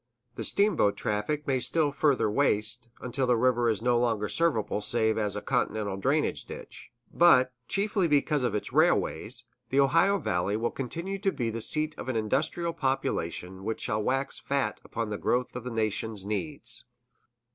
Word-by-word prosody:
The - - -5
steamboat 200 - +2
traffic 105 +9 -2
may 135 -2 +1
still 150 +3 +1
further 140 -4 +2
waste, 110 0 0
until 125 +1 -1
the 125 -1 +3
river 120 0 +3
is 110 0 -1
no 120 -1 +3
longer 115 -4 0
serviceable 145 -11 +1
save 110 0 +2
as 105 -2 -1
a 105 - -4
continental 110 -6 -1
drainage 140 +10 0
ditch; - - -10 0.2
but, 130 -7 +5
chiefly 200 -2 +1
because 150 -1 +2
of 120 -4 0
its 105 - -4
railways, - - +2 0.3
the 135 - +2
Ohio 165 +9 +4
Valley 95 - -1
will 120 +1 -1
continue 170 +9 -4
to 195 0 +1
be 120 -8 -2
the 115 +1 -4
seat 155 +6 0
of - - -5
an 130 - -1
industrial 155 +10 0
population 95 - -2
which 110 +2 -3
shall 105 +1 -1
wax 135 +5 -1
fat 135 -6 -1
upon 115 -2 -4
the 105 - -3
growth 125 0 0
of 125 -1 -6
the - - -3
nation's 110 -2 -1
needs. 115 +1 -1
125 Hz, 170 wpm, -28 LUFS, 110-145 Hz, 0.3 s, but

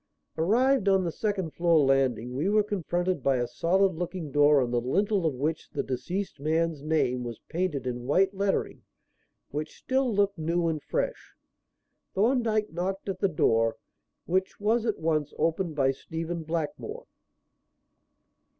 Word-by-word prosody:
Arrived 225 +6 +3
on 190 -1 +4
the 170 - -1
second 195 -4 -2
floor 170 -1 +3
landing, 130 -3 +1
we 155 +9 0
were 210 0 +4
confronted 180 -4 -1
by 135 +1 +2
a 120 - 0
solid 180 +10 +2
looking 170 -2 -4
door 145 0 +5
on 125 -2 0
the 120 -1 +1
lintel 195 - +1
of 145 - -1
which 150 +5 -2
the - - -3
deceased 160 +9 -4
man's 160 +1 0
name 145 -5 0
was 120 -2 -5
painted 165 -6 -1
in 125 -1 -4
white 190 +7 +3
lettering 195 0 -1 0.7
which 150 +2 -5
still 260 -1 0
looked 200 -3 +1
new 170 +2 0
and 155 -2 -1
fresh. - - -3 0.8
Thorndyke 220 -2 +1
knocked 190 +3 -3
at 190 -1 -3
the 195 - +2
door, 115 -8 +2 0.5
which 190 +2 -1
was 225 +3 +1
at 220 - 0
once 155 -2 -1
opened 165 +1 0
by 135 -2 +3
Stephen 165 +4 -5
Blackmore. 170 - -4
170 Hz, 150 wpm, -28 LUFS, 145-195 Hz, 0.8 s, door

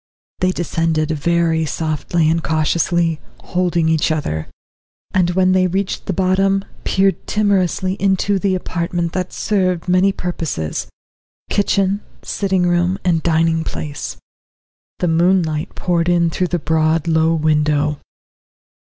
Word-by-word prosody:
They 185 0 +2
descended 165 -3 -1
very 165 +1 +1
softly 155 +2 -1
and 165 +1 +1
cautiously, 165 +1 +1 0.2
holding 175 -2 0
each 160 0 +2
other, 80 - -2 0.6
and 180 -2 +2
when 185 0 +3
they 185 0 +3
reached 190 +2 -2
the - - 0
bottom, 195 +1 +1 0.2
peered 195 0 +1
timorously 190 -2 +1
into 195 0 +2
the 190 -1 +1
apartment 170 -1 -2
that 185 -1 -2
served 185 -4 0
many 185 +2 +4
purposes 160 - -3 0.6
kitchen, 200 0 +1 0.2
sitting 190 -2 0
room, 175 +1 +1
and 170 -3 +2
dining 165 0 +2
place. 150 -2 -5 0.8
The 180 - 0
moonlight 165 -1 +1
poured 175 -1 0
in 170 -1 +2
through 180 +3 0
the 175 - -1
broad, 160 0 +1
low 160 0 +3
window. 150 -1 +1
170 Hz, 125 wpm, -18 LUFS, 160-185 Hz, 0.8 s, many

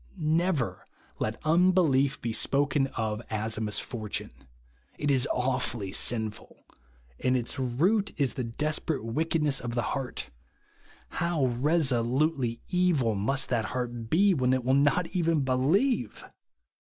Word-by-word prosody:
Never 160 -3 0 0.3
let 110 +1 -2
unbelief 160 -5 +3
be 115 -1 -3
spoken 140 +2 +1
of 110 -1 -2
as 110 0 -1
a 110 - -4
misfortune. 110 0 -4 0.7
It 145 -1 0
is 135 0 +3
awfully 125 -5 -1
sinful; 110 0 -2 0.5
and 130 0 +2
its 125 +3 -4
root 170 - +1
is 140 -3 +1
the 130 - -3
desperate 150 +2 -2
wickedness 150 +3 0
of 120 -1 -5
the 120 - 0
heart. 130 -2 -4 0.9
Hov/ 140 -9 0
resolutely 130 -3 +1
evil 175 - +2
must 135 +7 -1
that 115 -4 0
heart 120 -1 -4
be, 195 - +4
when 130 -5 +2
it 130 -1 0
will 130 +2 +2
not 145 +5 +3
even 165 -4 +1
believe 135 - +1
135 Hz, 125 wpm, -28 LUFS, 120-155 Hz, 0.9 s, be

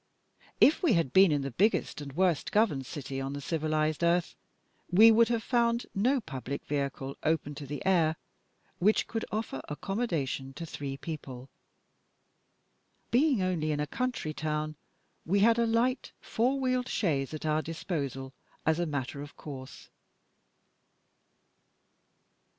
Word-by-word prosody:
If 300 - +5
we 330 -10 +4
had 165 -8 +1
been 190 -2 +7
in 145 -2 +1
the 135 - -4
biggest 195 - +1
and 140 -2 -7
worst 175 -1 +1
governed 170 - +2
city 135 -3 -5
on 135 +1 -3
the 145 - -4
civilised 155 +1 -1
earth, 170 0 +2 0.5
we 220 +5 +8
should 230 0 +6
have 230 -1 0
found 235 0 +1
no 250 +8 +2
public 140 - -6
vehicle, 140 -1 -3
open 155 -2 0
to 145 0 -8
the 145 +4 -6
air, 165 -4 +3 0.6
which 210 +5 +3
could 225 -1 -3
offer 215 -11 -3
accommodation 150 - -2
to 165 - -5
three 140 -3 -5
people. 135 -5 -7 1.6
Being 255 -4 +3
only 165 -4 0
in 145 - -1
a 150 - 0
country 230 - -3
town, 155 0 -2 0.5
we 195 +4 +1
had 230 +2 +5
a 235 - +3
light 240 +3 0
four 255 +4 0
wheeled 255 -1 0
chaise 140 - 0
at 155 0 -6
our 155 0 +2
disposal, 140 -5 -4 0.3
as 160 +1 +2
a 175 - 0
matter 140 -2 -3
of 145 0 -10
course. 135 -3 -9
160 Hz, 145 wpm, -30 LUFS, 140-220 Hz, 1.6 s, we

